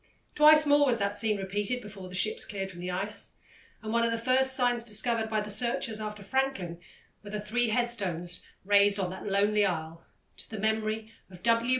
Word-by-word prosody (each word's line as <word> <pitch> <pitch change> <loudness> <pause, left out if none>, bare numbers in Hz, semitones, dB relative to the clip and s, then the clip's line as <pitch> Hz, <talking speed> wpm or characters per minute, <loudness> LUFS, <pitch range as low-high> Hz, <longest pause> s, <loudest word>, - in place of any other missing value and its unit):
Twice 305 0 +7
more 290 0 +5
was 240 -3 +2
that 200 -1 -1
scene 215 -1 0
repeated 205 +5 -2
before 200 -4 -10
the 185 - -8
ships 215 +3 +1
cleared 195 -2 -5
from 175 - -12
the 180 +1 -4
ice, 195 +4 -4 0.5
and 215 0 -4
one 235 0 +3
of 230 - +2
the 230 - -1
first 260 +3 +2
signs 245 -2 +1
discovered 225 0 0
by 215 -1 0
the 210 - -5
searchers 230 0 0
after 210 -1 -6
Franklin 200 -8 -2 0.4
were 205 - -11
the 210 +1 -4
three 230 +3 0
headstones 200 -8 -2 0.2
raised 205 0 +5
on 185 -2 -1
that 190 - -7
lonely 205 +1 +2
isle 165 -3 -3 0.3
to - - -13
the 220 - -6
memory 220 +1 -1 0.2
of 180 -2 -14
W. 230 +1 +2
215 Hz, 200 wpm, -29 LUFS, 195-235 Hz, 0.5 s, Twice